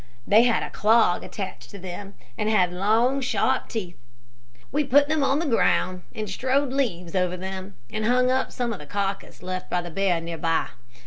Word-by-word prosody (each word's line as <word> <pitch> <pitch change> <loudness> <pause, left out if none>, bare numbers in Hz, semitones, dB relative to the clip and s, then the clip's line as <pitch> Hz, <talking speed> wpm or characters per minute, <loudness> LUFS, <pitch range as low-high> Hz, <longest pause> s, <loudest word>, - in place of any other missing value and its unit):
They 215 +2 +6
had 240 - +2
a - - -6
clog 215 -4 +3
attached 155 - -7
to - - -10
them, 190 +2 -8 0.2
and 215 - -1
had 180 -5 +3
long, 225 +8 +2
sharp 260 +1 0
teeth. 185 - -5 0.7
We 295 +2 +1
put 285 +1 +4
them 310 0 +1
on 275 +1 +2
the 335 - -1
ground 185 - +2
and 215 -1 -3
strewed 260 +7 0
leaves 180 -11 -1
over 180 -1 0
them, 190 +1 -6 0.2
and 215 0 -2
hung 250 +1 +3
up 260 +1 0
some 240 -2 -2
of 200 - -7
the 150 - -11
carcass 195 +1 -3
left 185 0 -4
by 175 0 0
the 175 - -7
bear 185 -1 +1
near 165 0 -6
by. 165 -1 +1
200 Hz, 195 wpm, -25 LUFS, 180-250 Hz, 0.7 s, They